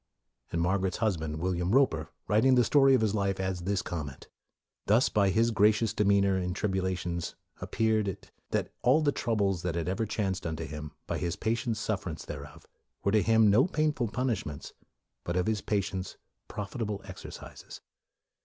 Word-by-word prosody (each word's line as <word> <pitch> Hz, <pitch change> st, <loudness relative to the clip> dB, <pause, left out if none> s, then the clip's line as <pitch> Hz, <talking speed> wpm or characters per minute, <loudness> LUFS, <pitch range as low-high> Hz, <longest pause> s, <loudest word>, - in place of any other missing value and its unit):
'' -, -, -41 dB
And 85 Hz, -, -1 dB
Margaret's 95 Hz, +2 st, 0 dB
husband, 80 Hz, -9 st, -1 dB
William 90 Hz, +2 st, -1 dB
Roper, 80 Hz, -, +3 dB, 0.2 s
writing 115 Hz, +5 st, +4 dB
the 125 Hz, -, +5 dB
story 135 Hz, +1 st, +5 dB
of 125 Hz, -, +2 dB
his 110 Hz, -2 st, +1 dB
life, 100 Hz, -2 st, 0 dB
adds 95 Hz, -2 st, -2 dB
this 100 Hz, +2 st, -1 dB
comment, 75 Hz, -6 st, -6 dB, 0.3 s
" -, -, -61 dB
Thus 110 Hz, +5 st, +4 dB
by 100 Hz, -2 st, +3 dB
his 115 Hz, +4 st, +2 dB
gracious 105 Hz, +1 st, +3 dB
demeanor 100 Hz, -2 st, +3 dB
in 90 Hz, 0 st, -2 dB
tribulations 95 Hz, -4 st, -2 dB, 0.3 s
ap -, -, -7 dB
peared 110 Hz, -2 st, +2 dB
it, 95 Hz, -, -6 dB, 0.2 s
that -, -, -1 dB
all 140 Hz, +6 st, +4 dB
the 145 Hz, -, +3 dB
troubles 100 Hz, -9 st, 0 dB
that 90 Hz, -2 st, -2 dB
ever 95 Hz, +7 st, -1 dB
chanced 95 Hz, -4 st, -2 dB
unto 80 Hz, 0 st, -4 dB
him, 75 Hz, -1 st, -7 dB
by -, -, -3 dB
his 85 Hz, -1 st, -2 dB
patient 115 Hz, 0 st, -1 dB
suffer 105 Hz, -4 st, -2 dB
ance 80 Hz, -, -7 dB
thereof 70 Hz, -1 st, -9 dB, 0.4 s
were 100 Hz, -, +2 dB
to 110 Hz, 0 st, +4 dB
him 110 Hz, -1 st, +5 dB
no 125 Hz, -, +5 dB
painful 155 Hz, -8 st, 0 dB
pun 125 Hz, +5 st, -1 dB
ishments, 75 Hz, -10 st, -4 dB, 0.5 s
but 85 Hz, +1 st, -2 dB
of 90 Hz, -, +1 dB
his 110 Hz, -1 st, 0 dB
patience 95 Hz, -2 st, -2 dB, 0.3 s
profitable 105 Hz, 0 st, -4 dB
ex 95 Hz, -, -9 dB
ercises.' -, -, -10 dB
100 Hz, 180 wpm, -29 LUFS, 90-110 Hz, 0.5 s, the